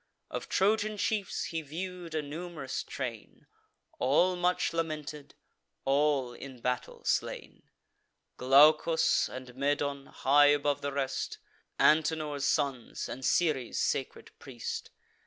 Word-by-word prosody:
Of -, -, -5 dB
Trojan 215 Hz, +2 st, +2 dB
chiefs 205 Hz, -1 st, -1 dB
he 165 Hz, -1 st, -3 dB
view'd 170 Hz, +2 st, -6 dB
a 155 Hz, -, 0 dB
num'rous 155 Hz, -1 st, -5 dB
train, 120 Hz, -5 st, -7 dB, 0.5 s
All 175 Hz, +8 st, +3 dB
much 180 Hz, 0 st, +1 dB
lamented, 155 Hz, -3 st, -4 dB, 0.5 s
all 140 Hz, -2 st, +2 dB
in 130 Hz, 0 st, -10 dB
battle 125 Hz, +1 st, -3 dB
slain; -, -, -2 dB, 0.7 s
Glaucus 150 Hz, +5 st, +5 dB
and 125 Hz, -1 st, -9 dB
Medon, 140 Hz, 0 st, -1 dB
high 145 Hz, +2 st, +4 dB
above 145 Hz, 0 st, +2 dB
the 140 Hz, -, -2 dB
rest, 135 Hz, -1 st, -2 dB, 0.4 s
Antenor's 155 Hz, -2 st, +2 dB
sons, 135 Hz, -4 st, -1 dB
and 130 Hz, -, -7 dB
Ceres' 145 Hz, -6 st, +1 dB
sacred 135 Hz, -, -2 dB
priest. 125 Hz, -4 st, -6 dB
145 Hz, 110 wpm, -30 LUFS, 135-165 Hz, 0.7 s, Glaucus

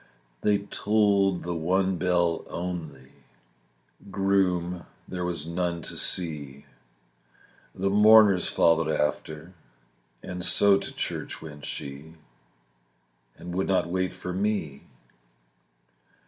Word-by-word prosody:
They 105 Hz, -1 st, +3 dB
tolled 100 Hz, -2 st, +1 dB
the 85 Hz, -, -3 dB
one 95 Hz, +3 st, 0 dB
bell 85 Hz, -1 st, +1 dB
only, 80 Hz, -7 st, -6 dB, 1.0 s
Groom 90 Hz, -3 st, 0 dB, 0.2 s
there 90 Hz, -1 st, -4 dB
was 85 Hz, -4 st, -3 dB
none 85 Hz, 0 st, -2 dB
to -, -, -5 dB
see, 75 Hz, -6 st, -1 dB, 1.1 s
The 95 Hz, +1 st, -1 dB
mourners 105 Hz, -2 st, +6 dB
followed 80 Hz, -1 st, +3 dB
after, 80 Hz, +2 st, -2 dB, 0.7 s
And 90 Hz, -1 st, -6 dB
so 100 Hz, +1 st, +4 dB
to -, -, -5 dB
church -, -, -4 dB
went 75 Hz, -2 st, -9 dB
she, 70 Hz, +4 st, -7 dB, 1.2 s
And 85 Hz, +1 st, -8 dB
would 95 Hz, +2 st, -1 dB
not 95 Hz, -3 st, +1 dB
wait 95 Hz, 0 st, 0 dB
for 90 Hz, 0 st, -6 dB
me. 95 Hz, -8 st, -2 dB
90 Hz, 105 wpm, -26 LUFS, 80-95 Hz, 1.2 s, mourners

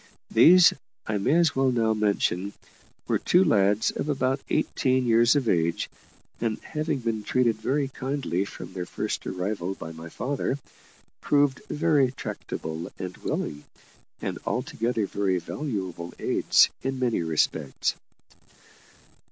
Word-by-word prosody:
These, 170 Hz, +9 st, +7 dB, 0.3 s
I 105 Hz, -2 st, -1 dB
may 135 Hz, +10 st, +2 dB
as 170 Hz, -3 st, +3 dB
well 135 Hz, -1 st, +3 dB
now 115 Hz, -2 st, +2 dB
mention, 100 Hz, -2 st, 0 dB, 0.5 s
were -, -, +1 dB
two 180 Hz, +2 st, +4 dB
lads 105 Hz, -, +3 dB
of 150 Hz, -, -4 dB
about 135 Hz, -1 st, 0 dB
eighteen 130 Hz, -1 st, +1 dB
years 120 Hz, +2 st, +5 dB
of 135 Hz, -4 st, +1 dB
age, 85 Hz, -3 st, +1 dB, 0.5 s
and, 115 Hz, -2 st, -1 dB
having 155 Hz, -1 st, -2 dB
been 115 Hz, -2 st, -1 dB
treated 120 Hz, 0 st, +1 dB
very 135 Hz, +5 st, 0 dB
kindly 130 Hz, -8 st, -2 dB
from 100 Hz, -, -9 dB
their 90 Hz, -1 st, -4 dB
first -, -, -3 dB
arrival 95 Hz, 0 st, -3 dB
by 80 Hz, -, -8 dB
my 80 Hz, +1 st, -9 dB
father, 135 Hz, -, -2 dB, 0.6 s
proved 145 Hz, -2 st, +2 dB
very 150 Hz, -5 st, +2 dB
tractable 80 Hz, -9 st, -6 dB
and 90 Hz, -1 st, -6 dB
willing, 75 Hz, 0 st, -3 dB, 0.6 s
and -, -, -3 dB
altogether 115 Hz, -2 st, -1 dB
very 95 Hz, -2 st, 0 dB
valuable 95 Hz, -, -5 dB
aids -, -, +4 dB
in 135 Hz, 0 st, -2 dB
many 125 Hz, -7 st, 0 dB
respects. 80 Hz, -4 st, 0 dB
115 Hz, 130 wpm, -26 LUFS, 95-135 Hz, 0.6 s, These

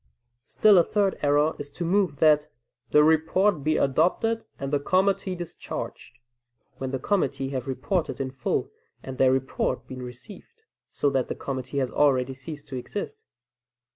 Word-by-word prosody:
Still 210 Hz, -4 st, +5 dB
a -, -, +5 dB
third 200 Hz, +1 st, 0 dB
error 145 Hz, +2 st, +2 dB
is 145 Hz, 0 st, -6 dB
to 170 Hz, +4 st, -5 dB
move 185 Hz, -3 st, +2 dB
that 150 Hz, 0 st, +4 dB, 0.4 s
"the 150 Hz, -, +6 dB
report 160 Hz, +2 st, +3 dB
be 155 Hz, +1 st, +2 dB
adopted 180 Hz, -, +1 dB
and 135 Hz, +1 st, -5 dB
the 145 Hz, -, +3 dB
committee 185 Hz, +4 st, +1 dB
discharged," 175 Hz, -1 st, -7 dB, 0.6 s
when 130 Hz, -, -4 dB
the 135 Hz, -, -2 dB
committee 135 Hz, -4 st, -1 dB
have 130 Hz, -2 st, -4 dB
reported 135 Hz, +1 st, -2 dB
in 135 Hz, -1 st, -3 dB
full 130 Hz, -, -2 dB, 0.3 s
and 130 Hz, -1 st, -8 dB
their 130 Hz, -1 st, +5 dB
report 130 Hz, 0 st, -1 dB
been 130 Hz, -1 st, -8 dB
received, 195 Hz, -, -12 dB, 0.3 s
so 145 Hz, -, 0 dB
that 130 Hz, -2 st, 0 dB
the -, -, -4 dB
committee 130 Hz, 0 st, -5 dB
has 130 Hz, -2 st, 0 dB
already 135 Hz, -3 st, +2 dB
ceased 145 Hz, +3 st, -9 dB
to 130 Hz, -, -4 dB
exist. 430 Hz, -, -6 dB
145 Hz, 160 wpm, -26 LUFS, 135-185 Hz, 0.6 s, the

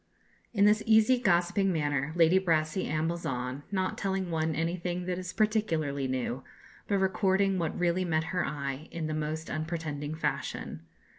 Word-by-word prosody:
In 200 Hz, -3 st, +3 dB
this 210 Hz, +1 st, +5 dB
easy, 220 Hz, +3 st, +5 dB
gossiping 190 Hz, -1 st, +2 dB
manner 145 Hz, -3 st, 0 dB
Lady 170 Hz, +2 st, +5 dB
Brassey 165 Hz, -1 st, +1 dB
ambles 160 Hz, +3 st, -1 dB
on, 125 Hz, +1 st, -3 dB
not 190 Hz, -2 st, -1 dB
telling 190 Hz, -2 st, -1 dB
one 160 Hz, -1 st, 0 dB
anything 175 Hz, +2 st, -2 dB
that 180 Hz, 0 st, -2 dB
is 180 Hz, -1 st, -5 dB
particularly 165 Hz, -11 st, 0 dB
new, 130 Hz, 0 st, -2 dB, 0.4 s
but 200 Hz, -, +2 dB
recording 190 Hz, 0 st, +2 dB
what 165 Hz, -2 st, -2 dB
really 175 Hz, +1 st, +2 dB
met 160 Hz, -3 st, +1 dB
her 180 Hz, -, +1 dB
eye 140 Hz, +1 st, -4 dB
in 165 Hz, -1 st, -4 dB
the 155 Hz, -, -2 dB
most 155 Hz, +1 st, -3 dB
unpretending 155 Hz, -2 st, -3 dB
fashion. 80 Hz, -, -3 dB
170 Hz, 155 wpm, -29 LUFS, 155-190 Hz, 0.4 s, this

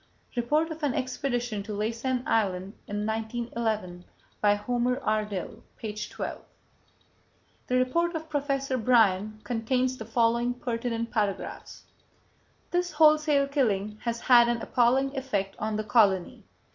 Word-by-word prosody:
"—(Report 300 Hz, +7 st, +1 dB
of 320 Hz, +1 st, -7 dB
an 285 Hz, -4 st, 0 dB
Expedition 245 Hz, -4 st, -2 dB
to 210 Hz, +1 st, -6 dB
Laysan 235 Hz, +4 st, -1 dB
Island 195 Hz, -3 st, 0 dB
in 205 Hz, +1 st, -3 dB
1911. 220 Hz, -4 st, -3 dB, 0.4 s
By 205 Hz, -1 st, +4 dB
Homer 245 Hz, +4 st, 0 dB
R. 215 Hz, -4 st, +1 dB
Dill, 195 Hz, -4 st, -6 dB
page 210 Hz, -1 st, -5 dB
12.) -, -, -5 dB, 1.3 s
The 250 Hz, -, 0 dB
report 335 Hz, +7 st, +1 dB
of 320 Hz, 0 st, -4 dB
Professor 275 Hz, -3 st, -1 dB
Bryan 215 Hz, -3 st, +3 dB
contains 250 Hz, +3 st, 0 dB
the 220 Hz, -, -7 dB
following 235 Hz, +2 st, +1 dB
pertinent 230 Hz, -1 st, -3 dB
paragraphs: 205 Hz, -4 st, -3 dB, 0.9 s
"This 355 Hz, -1 st, 0 dB
wholesale 305 Hz, -2 st, +4 dB
killing 215 Hz, -7 st, 0 dB
has 235 Hz, -1 st, -3 dB
had 240 Hz, -2 st, +6 dB
an 235 Hz, -1 st, -1 dB
appalling 265 Hz, +3 st, +2 dB
effect 205 Hz, -8 st, -2 dB
on 215 Hz, 0 st, -2 dB
the 215 Hz, -, -1 dB
colony.... 205 Hz, -5 st, +2 dB
235 Hz, 130 wpm, -27 LUFS, 215-260 Hz, 1.3 s, had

